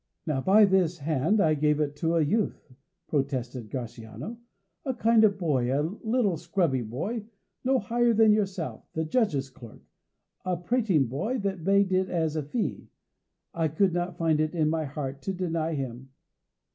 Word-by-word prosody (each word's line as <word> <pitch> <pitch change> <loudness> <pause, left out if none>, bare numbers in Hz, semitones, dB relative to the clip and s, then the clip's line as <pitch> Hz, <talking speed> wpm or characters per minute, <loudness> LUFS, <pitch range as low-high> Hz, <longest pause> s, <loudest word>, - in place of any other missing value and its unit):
"Now, 150 -5 -1
by 205 +7 +6
this 185 -3 +2
hand. 155 +6 +1
I 160 -5 +4
gave 150 0 +2
it 145 -1 -1
to 165 +2 0
a 165 - +3
youth," 190 - -1 0.3
protested 130 -5 -2
the 130 - -3
exasperated 115 -1 -10
Gratiano; 195 - -6 0.5
"a 260 -2 -2
kind 230 -1 +4
of 200 -2 +4
boy 135 -9 0
a 140 +2 +1 0.2
little 220 -6 +1
scrubby 170 -5 0
boy, 200 - -4 0.4
no 265 +1 +3
higher 240 +2 +2
than 220 -1 +5
yourself, 195 -5 -3
the 160 0 -1
judge's 155 - 0
clerk, 115 -4 -13 0.6
a 185 -1 -1
prating 185 - +1
boy 145 - -2
that 195 -4 -3
begged 195 +1 +3
it 185 0 +2
as 160 -3 0
a 155 - 0
fee. 180 - -3 0.6
I 165 -1 +1
could 175 +4 +1
not 175 0 -2
find 160 -3 +2
it 155 +2 0
in 155 -2 +2
my 160 -1 -1
heart 140 -1 -5
to 195 - -3
deny 165 -3 -1
him." 130 -1 -5
165 Hz, 175 wpm, -27 LUFS, 145-200 Hz, 0.6 s, by